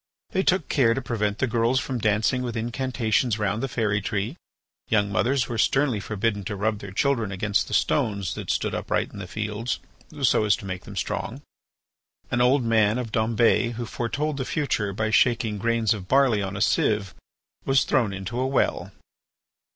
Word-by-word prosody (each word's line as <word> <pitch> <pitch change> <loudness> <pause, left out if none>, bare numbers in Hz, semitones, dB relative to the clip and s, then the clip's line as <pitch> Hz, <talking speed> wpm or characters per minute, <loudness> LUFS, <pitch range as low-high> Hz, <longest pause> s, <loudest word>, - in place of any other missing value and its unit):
They 190 - +1
took 185 -4 +1
care 115 -5 +3
to - - -1
prevent 105 -4 -1
the - - +1
girls 120 +1 +1
from 130 -1 -3
dancing 110 +4 +1
with 120 -2 -3
incantations 120 -1 0
round 105 +1 -1
the 135 - -1
fairy 105 -4 0
tree. 105 +7 -2 0.5
Young 100 -2 +1
mothers 125 +5 +1
were 115 -2 -3
sternly 135 -2 +2
forbidden 105 0 -2
to 105 - -3
rub 105 +1 -1
their 100 - -8
children 115 -1 0
against 100 +1 0
the - - -1
stones 100 -5 +1
that - - -7
stood - - 0
upright - - -1
in - - -8
the 95 - -6
fields 105 +4 -3 0.4
so 125 - +4
as 105 -1 +3
to 115 - -10
make 95 -1 -5
them - - -9
strong. - - -3 0.9
An 120 - +1
old 130 +2 +4
man 110 -1 +3
of 120 -3 -4
Dombes 115 +1 +2
who 120 +1 -4
foretold 140 +6 -2
the 135 - -1
future 125 -10 -1
by 110 +3 -2
shaking 115 -3 +2
grains 115 0 +2
of 95 -4 -7
barley 130 -5 +3
on 100 0 -4
a - - -4
sieve, 105 -4 +1 0.5
was 135 -1 +3
thrown 120 -6 +1
into 100 +5 -5
a 130 - +1
well. 135 -1 0
115 Hz, 185 wpm, -25 LUFS, 105-125 Hz, 0.9 s, so